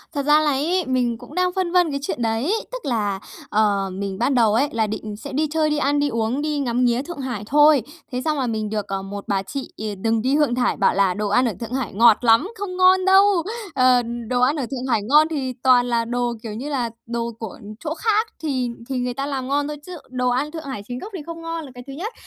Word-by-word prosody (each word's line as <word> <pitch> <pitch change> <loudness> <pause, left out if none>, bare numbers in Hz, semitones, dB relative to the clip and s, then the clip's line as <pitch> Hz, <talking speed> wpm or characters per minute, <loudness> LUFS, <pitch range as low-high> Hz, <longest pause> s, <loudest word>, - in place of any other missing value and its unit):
Thật 280 -1 -1
ra 295 +1 +6
là 300 - +2
ấy 330 +6 0
mình 245 -3 0
cũng 245 +7 -13
đang 365 0 +1
phân 370 -2 -1
vân 355 -4 +3
cái 280 - -2
chuyện 245 - -3
đấy, 230 - 0 0.2
tức - - -6
là, 210 -6 -1 0.3
ờ, 205 -2 +2
mình 195 0 -4
ban 275 - +2
đầu 225 -3 +4
ấy 270 +6 +3
là 220 -2 0
định 215 0 -5
sẽ 220 - -8
đi 305 +3 +1
chơi, 315 -1 +2
đi 300 - 0
ăn, 290 0 +1
đi 290 - +1
uống, 230 +4 -1
đi 300 -1 -1
ngắm 250 -2 +1
nghía 240 +1 +2
Thượng 320 +2 -8
Hải 245 -6 -4
thôi. 295 -1 +6 0.3
Thế 250 - -2
xong 305 -2 0
là 255 - 0
mình 215 -2 -2
được, 210 -1 -3
ờ, 195 0 -3
một 200 +1 -7
bà 195 -1 0
chị, 275 +6 -6
ờ, 215 - -5 0.2
đừng 225 0 +1
đi 260 +5 +1
Thượng 295 -5 +2
Thải, 250 -1 +1
bảo - - +3
là 195 -2 +3
"Đồ 210 +1 -2
ăn 250 +5 +3
ở 230 - 0
Thượng 235 +1 -6
Hải 260 -7 -2
ngọt 225 +1 +6
lắm, 230 +10 +5
không 385 -2 -5
ngon 370 0 +5
đâu! 385 +1 +7 0.5
Ờ, 255 -1 +5 0.3
đồ 245 +1 0
ăn 270 +5 +3
ở 275 - -2
Thượng 260 -1 -4
Hải 220 - +2
ngon 300 +8 +5
thì 270 -5 -2
toàn 250 -2 +5
là 230 -1 +1
đồ, 240 0 -1
kiểu 220 - -5
như 255 +7 -5
là, 255 -5 -1 0.2
đồ 235 0 -2
của 220 -4 -7 0.2
chỗ 315 -1 -3
khác 435 +5 +1 0.2
thì 260 -5 -1 0.2
thì 265 - -1
người 245 0 -2
ta 275 +3 -3
làm 270 -2 -3
ngon 285 +1 0
thôi. 300 - -5
Chứ 360 -2 -7
đồ 250 -1 0
ăn 270 +5 0
Thượng 320 -1 -6
Hải 265 -8 -5
chính 245 0 -5
gốc 425 - -8
thì 355 - -5
không 335 0 -7
ngon 330 -1 -4
là 270 - -11
cái 245 - -9
thứ 275 - -7
nhất. 400 - -5
255 Hz, 265 wpm, -22 LUFS, 230-300 Hz, 0.5 s, đâu